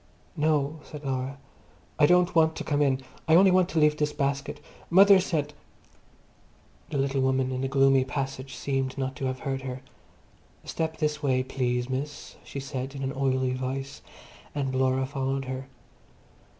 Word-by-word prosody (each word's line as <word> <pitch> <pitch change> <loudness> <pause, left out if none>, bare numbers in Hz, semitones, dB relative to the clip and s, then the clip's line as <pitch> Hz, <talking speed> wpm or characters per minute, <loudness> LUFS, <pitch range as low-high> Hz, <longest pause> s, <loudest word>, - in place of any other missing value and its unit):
"No," 150 0 +1
said 150 -1 -10
Laura, 130 +1 -2 0.6
"I 145 - +6
don't 180 +1 +4
want 160 -1 +4
to - - -4
come 145 -1 0
in. 135 -2 +2 0.3
I 160 - +6
only 190 +2 +7
want 185 -1 +3
to 170 - -4
leave 150 0 +4
this 150 0 0
basket. 140 0 -2 0.3
Mother 195 +2 +7
sent—" 150 -5 -1 1.4
The 145 - -2
little 135 0 0
woman 130 0 +1
in 130 0 -2
the 135 - 0
gloomy 135 -1 +4
passage 135 -1 -4
seemed 135 0 -2
not 130 -1 -2
to 135 - -3
have 130 0 -3
heard 135 -1 -2
her. 130 -1 -6 0.8
"Step 160 0 -3
this 150 -1 -1
way, 130 -3 +1
please, 125 -2 -1
miss," 135 +3 -5
she 140 - -7
said 135 0 -5
in 135 - -5
an 135 0 -2
oily 130 -1 0
voice, 130 +1 -4 0.5
and 135 -2 -1
Laura 130 0 +1
followed 135 0 -2
her. 130 +1 -5
135 Hz, 165 wpm, -27 LUFS, 130-150 Hz, 1.4 s, only